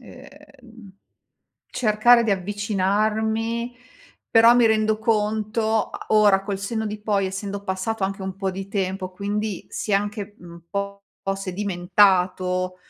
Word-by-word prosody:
ehm, 255 Hz, -5 st, -15 dB, 0.7 s
cercare 235 Hz, +1 st, +4 dB
di 225 Hz, -, 0 dB
avvicinarmi, 215 Hz, +4 st, -1 dB, 0.6 s
però 230 Hz, +1 st, +7 dB
mi 245 Hz, -1 st, +5 dB
rendo 215 Hz, -1 st, +2 dB
conto 220 Hz, 0 st, 0 dB
a -, -, -9 dB
ora 205 Hz, -3 st, +4 dB
col 200 Hz, -1 st, -3 dB
senno 220 Hz, +3 st, -3 dB
di 210 Hz, 0 st, -5 dB
poi, 205 Hz, -2 st, 0 dB
essendo 200 Hz, +1 st, -5 dB
passato 190 Hz, +2 st, -2 dB
anche 195 Hz, +1 st, -3 dB
un 190 Hz, -1 st, -5 dB
po' 195 Hz, -1 st, -2 dB
di 190 Hz, +1 st, -7 dB
tempo, 190 Hz, -2 st, -2 dB
quindi 205 Hz, +1 st, -3 dB
si -, -, -4 dB
è -, -, +4 dB
anche 205 Hz, 0 st, -2 dB
un 170 Hz, -1 st, -12 dB
po' 200 Hz, 0 st, -4 dB, 0.3 s
sedimentato 185 Hz, -1 st, +1 dB
205 Hz, 130 wpm, -23 LUFS, 195-220 Hz, 0.7 s, però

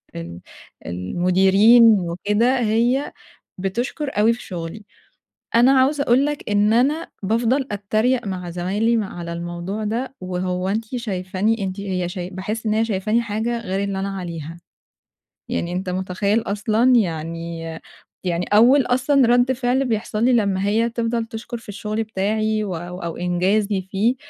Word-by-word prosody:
ال 85 Hz, +1 st, -7 dB, 0.5 s
المديرين 190 Hz, -, +4 dB, 0.2 s
وكده، 210 Hz, +9 st, +1 dB
هي 240 Hz, +5 st, +1 dB, 0.5 s
بتشكُر 240 Hz, -, -2 dB
أوي 225 Hz, +2 st, +5 dB
في 235 Hz, -, -6 dB
شُغلي، 180 Hz, +3 st, -7 dB, 0.7 s
أنا 245 Hz, +3 st, +6 dB
عاوزة 280 Hz, +2 st, +2 dB
أقول 260 Hz, +4 st, +3 dB
لك 295 Hz, -7 st, -4 dB
إن 205 Hz, +1 st, +3 dB
أنا 285 Hz, +8 st, +2 dB
بافضَل 235 Hz, +6 st, +1 dB
أتَّريق 215 Hz, +4 st, 0 dB
مع 180 Hz, -2 st, -4 dB
زمايلي 200 Hz, +7 st, 0 dB
مع 200 Hz, -5 st, -3 dB
على 170 Hz, 0 st, -5 dB
الموضوع 175 Hz, +5 st, -4 dB
ده، 245 Hz, +5 st, -3 dB
وهو 180 Hz, 0 st, -2 dB
أنتِ 220 Hz, +3 st, -1 dB
شايفاني 200 Hz, -1 st, -1 dB
أنتِ 190 Hz, +1 st, -4 dB
هي 185 Hz, -3 st, -2 dB
شاي 180 Hz, 0 st, -5 dB
باحس 210 Hz, +4 st, -5 dB
إن 215 Hz, -, +1 dB
هي 220 Hz, +1 st, +2 dB
شايفاني 215 Hz, +2 st, 0 dB
حاجة 230 Hz, +2 st, -2 dB
غير 195 Hz, -2 st, -2 dB
اللي 195 Hz, -1 st, -2 dB
أنا 195 Hz, 0 st, -3 dB
عليها. 165 Hz, -3 st, -6 dB, 0.9 s
يعني 170 Hz, -, -2 dB
أنت 185 Hz, +1 st, -3 dB
متخيِّل 190 Hz, +4 st, 0 dB
أصلًا، 220 Hz, +5 st, +2 dB
يعني 165 Hz, -3 st, -1 dB, 0.6 s
يعني 175 Hz, -1 st, -1 dB
أوّل 245 Hz, +7 st, +6 dB
أصلًا 255 Hz, +1 st, +3 dB
رد 245 Hz, +2 st, +4 dB
فعل 260 Hz, +1 st, 0 dB
بيحصل 220 Hz, -1 st, -1 dB
لي 255 Hz, -, +4 dB
لمّا 200 Hz, -4 st, +1 dB
هي 225 Hz, +3 st, +2 dB
تفضَل 230 Hz, 0 st, -1 dB
تشكُر 230 Hz, +1 st, -7 dB
في 225 Hz, -, -14 dB
الشغل 210 Hz, +2 st, -3 dB
بتاعي 215 Hz, +1 st, -1 dB
و 190 Hz, -4 st, -3 dB
أو 175 Hz, +2 st, -7 dB
أو 170 Hz, -1 st, -4 dB
إنجازي 190 Hz, +3 st, +1 dB
فيه، 220 Hz, +6 st, +2 dB
210 Hz, 150 wpm, -21 LUFS, 185-235 Hz, 0.9 s, أنا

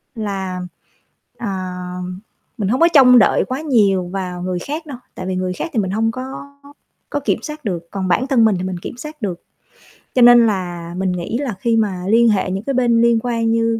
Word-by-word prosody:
là, 195 Hz, -4 st, -4 dB, 0.8 s
à, 190 Hz, -6 st, -4 dB, 0.8 s
mình 200 Hz, -3 st, -1 dB
hông 255 Hz, +5 st, 0 dB
có 335 Hz, -, +7 dB
trông 250 Hz, -4 st, +8 dB
đợi -, -, +3 dB
quá 260 Hz, +3 st, -4 dB
nhiều 200 Hz, -, +2 dB
vào 180 Hz, -1 st, -5 dB
người 180 Hz, -1 st, -2 dB
khác 305 Hz, -, -5 dB
đâu, 275 Hz, -5 st, -8 dB, 0.2 s
tại 185 Hz, -, -6 dB
vì 185 Hz, -, -2 dB
người 185 Hz, 0 st, -2 dB
khác 330 Hz, -, -4 dB
thì 225 Hz, -, +1 dB
mình 190 Hz, -2 st, -1 dB
hông 225 Hz, +2 st, +1 dB
có 255 Hz, +2 st, -6 dB, 0.9 s
có 290 Hz, -, -1 dB
kiểm 280 Hz, -, -1 dB
soát 300 Hz, -3 st, -8 dB
được, 175 Hz, -4 st, -3 dB
còn 190 Hz, -2 st, -3 dB
bản 250 Hz, +9 st, +1 dB
thân 245 Hz, -5 st, +4 dB
mình 215 Hz, -, +3 dB
thì 185 Hz, -, -3 dB
mình 185 Hz, -1 st, -3 dB
kiểm 240 Hz, -, -8 dB
soát 300 Hz, +1 st, -9 dB
được. 185 Hz, -5 st, -4 dB, 0.7 s
Cho 255 Hz, -, +4 dB
nên 240 Hz, -1 st, +8 dB
là 175 Hz, -4 st, -3 dB
mình 190 Hz, -1 st, 0 dB
nghĩ 180 Hz, +5 st, -3 dB
là 260 Hz, -5 st, -3 dB
khi 230 Hz, +2 st, +1 dB
mà 195 Hz, -5 st, -1 dB
liên 230 Hz, +2 st, +5 dB
hệ 190 Hz, -3 st, +1 dB
những 195 Hz, +3 st, -3 dB
cái 275 Hz, -, -2 dB
bên 240 Hz, -2 st, +3 dB
liên 235 Hz, -1 st, +4 dB
quan 230 Hz, -2 st, 0 dB
như 230 Hz, 0 st, +1 dB
220 Hz, 220 wpm, -19 LUFS, 185-245 Hz, 0.9 s, trông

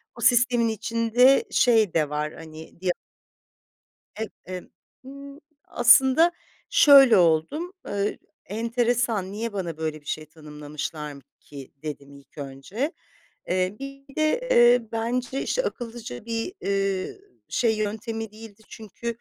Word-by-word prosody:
o 235 Hz, -, -10 dB
sistemin 245 Hz, -1 st, +4 dB
içinde 230 Hz, +4 st, +3 dB
şey 225 Hz, -7 st, +3 dB
de 155 Hz, -3 st, +1 dB
var 150 Hz, +1 st, -3 dB
hani 160 Hz, +2 st, -12 dB
di 185 Hz, -, +1 dB, 1.3 s
Eee, 220 Hz, -1 st, -3 dB, 0.2 s
emm, 185 Hz, -1 st, -7 dB, 0.4 s
ııı, 280 Hz, +1 st, -11 dB, 0.2 s
aslında 265 Hz, +7 st, +5 dB, 0.4 s
şöyle 280 Hz, -, +8 dB
oldum, 180 Hz, -, +2 dB, 0.2 s
ııı, 205 Hz, 0 st, -1 dB, 0.3 s
enteresan 230 Hz, -2 st, -1 dB
"niye 225 Hz, +2 st, -4 dB
bana 175 Hz, -5 st, -4 dB
böyle 155 Hz, -1 st, -4 dB
bir 145 Hz, -, -29 dB
şey 155 Hz, 0 st, -4 dB
tanımlamışlar 150 Hz, -1 st, -7 dB, 0.2 s
ki" 140 Hz, -2 st, -12 dB
dedim 140 Hz, -2 st, -7 dB
ilk 140 Hz, +1 st, -18 dB
önce. 145 Hz, -, -4 dB, 0.6 s
Eee, 185 Hz, +2 st, 0 dB
bir 275 Hz, 0 st, -10 dB
de, 320 Hz, +12 st, 0 dB
eee, 240 Hz, -, +6 dB
bence 245 Hz, +3 st, -2 dB
işte -, -, 0 dB
akıllıca 230 Hz, -, -6 dB
bir, 230 Hz, +7 st, -3 dB
ııı, 195 Hz, -, -1 dB, 0.3 s
şey 225 Hz, -2 st, +1 dB
yöntemi 220 Hz, +1 st, -4 dB
değildi. 220 Hz, -1 st, -13 dB
Çünkü, 220 Hz, +2 st, -11 dB
220 Hz, 120 wpm, -25 LUFS, 165-245 Hz, 1.3 s, şöyle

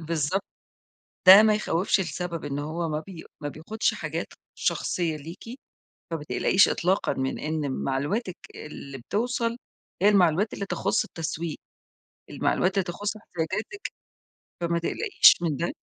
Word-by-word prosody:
بالضبط، 165 Hz, +3 st, -1 dB, 0.8 s
ده 195 Hz, +3 st, +11 dB
ما 215 Hz, -1 st, +4 dB
يخوّفش 195 Hz, -1 st, +1 dB
لسبب، 170 Hz, -2 st, -4 dB
إن 145 Hz, 0 st, -3 dB
هو 160 Hz, +3 st, -3 dB
ما 150 Hz, -, -1 dB
بي 175 Hz, -4 st, -9 dB, 0.2 s
ما 145 Hz, -, -3 dB
بياخدش 165 Hz, +10 st, -1 dB
حاجات -, -, -4 dB, 0.3 s
شخصية 165 Hz, -4 st, -1 dB
ليكِ، 165 Hz, +6 st, -10 dB, 0.7 s
فما 160 Hz, -3 st, -4 dB
تقلقيش 195 Hz, +2 st, +4 dB
إطلاقًا 185 Hz, +3 st, +1 dB
من 130 Hz, 0 st, -2 dB
إن 155 Hz, -2 st, -2 dB
معلوماتِك 160 Hz, -, -2 dB, 0.2 s
اللي 140 Hz, -2 st, -8 dB
بتوصل 230 Hz, -, -1 dB, 0.5 s
هي 205 Hz, -, +6 dB
المعلومات 195 Hz, 0 st, +3 dB
اللي 200 Hz, -, -4 dB
تخص 200 Hz, +1 st, 0 dB
التسويق، 165 Hz, 0 st, -4 dB, 0.7 s
المعلومات 185 Hz, +1 st, +1 dB
اللي 195 Hz, -2 st, +1 dB
تخص 200 Hz, +4 st, -4 dB
احتياجاتِك، 210 Hz, -, -4 dB, 0.7 s
فما 170 Hz, 0 st, 0 dB
تقلقيش 415 Hz, -, +5 dB
من 160 Hz, -4 st, 0 dB
ده. 170 Hz, +5 st, -2 dB
170 Hz, 130 wpm, -26 LUFS, 155-200 Hz, 0.8 s, ده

